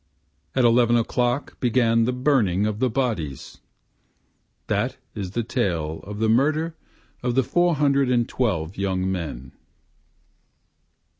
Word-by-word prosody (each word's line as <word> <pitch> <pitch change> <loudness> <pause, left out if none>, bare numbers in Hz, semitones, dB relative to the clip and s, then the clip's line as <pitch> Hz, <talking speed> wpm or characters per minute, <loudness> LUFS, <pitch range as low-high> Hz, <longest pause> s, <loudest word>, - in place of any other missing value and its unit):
At 130 -2 +3
eleven 120 0 +4
o'clock 120 +3 -1
began 115 -2 +2
the 125 - +1
burning 125 -8 +2
of 105 0 -2
the 130 0 +2
bodies; 110 - -3 1.1
That - - -1 0.2
is 95 -3 -5
the 120 - -1
tale 85 - -2
of 105 +2 -7
the 110 +1 +1
murder 155 +8 +2 0.5
of 125 -1 -1
the 135 - +4
four 175 +6 +2
hundred 140 -2 +2
and 120 -2 +2
twelve 95 -8 -2
young 95 -1 -1
men. 70 -8 -5
115 Hz, 130 wpm, -23 LUFS, 95-130 Hz, 1.1 s, eleven